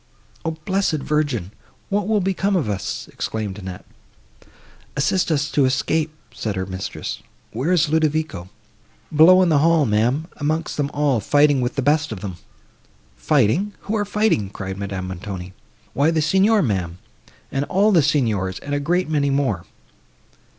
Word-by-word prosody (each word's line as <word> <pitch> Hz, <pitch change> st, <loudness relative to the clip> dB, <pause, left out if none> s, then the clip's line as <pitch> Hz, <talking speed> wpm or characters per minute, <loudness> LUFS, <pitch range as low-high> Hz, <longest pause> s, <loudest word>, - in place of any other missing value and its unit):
"O -, -, -1 dB, 0.2 s
blessed 190 Hz, -4 st, +1 dB
Virgin! 145 Hz, -, -1 dB, 0.4 s
what 205 Hz, 0 st, 0 dB
will 215 Hz, -2 st, +2 dB
become 195 Hz, +1 st, 0 dB
of 165 Hz, -10 st, 0 dB
us?" 100 Hz, -2 st, -3 dB
exclaimed 105 Hz, -3 st, -4 dB
Annette. 95 Hz, -2 st, -8 dB, 1.1 s
"Assist 145 Hz, +7 st, +1 dB
us 150 Hz, 0 st, 0 dB
to 140 Hz, -, +3 dB
escape," 150 Hz, +4 st, +1 dB, 0.2 s
said 105 Hz, -2 st, -3 dB
her 95 Hz, 0 st, -2 dB
mistress. 95 Hz, 0 st, -5 dB, 0.3 s
"Where 130 Hz, +10 st, -1 dB
is 170 Hz, -3 st, +3 dB
Ludovico?" 155 Hz, -, 0 dB, 0.7 s
"Below 185 Hz, +5 st, +7 dB
in 180 Hz, -, +2 dB
the 150 Hz, -3 st, +4 dB
hall, 165 Hz, 0 st, +4 dB
ma'am, 120 Hz, +8 st, +1 dB
amongst 155 Hz, +2 st, -2 dB
them 145 Hz, -1 st, 0 dB
all, 145 Hz, -5 st, +1 dB
fighting 145 Hz, +4 st, +3 dB
with 125 Hz, -, -2 dB
the 140 Hz, -, -1 dB
best 150 Hz, +1 st, +2 dB
of 105 Hz, -, -6 dB
them!" 95 Hz, -4 st, -6 dB, 0.8 s
"Fighting! 150 Hz, -, +1 dB
Who 215 Hz, -, -3 dB
are 210 Hz, -, +1 dB
fighting?" 205 Hz, -, +1 dB
cried 95 Hz, -1 st, -6 dB
Madame 95 Hz, -2 st, -4 dB
Montoni. 95 Hz, 0 st, -6 dB, 0.4 s
"Why 145 Hz, +3 st, +3 dB
the 160 Hz, -2 st, +1 dB
Signor, 195 Hz, +6 st, +3 dB
ma'am, 90 Hz, -7 st, -2 dB, 0.5 s
and 140 Hz, +1 st, -1 dB
all 200 Hz, +6 st, +3 dB
the 175 Hz, -5 st, +5 dB
Signors, 110 Hz, -11 st, 0 dB
and 145 Hz, -, -6 dB
a 145 Hz, -, +1 dB
great 175 Hz, +5 st, 0 dB
many 145 Hz, -2 st, +1 dB
more." 135 Hz, -11 st, 0 dB
145 Hz, 155 wpm, -21 LUFS, 105-165 Hz, 1.1 s, Below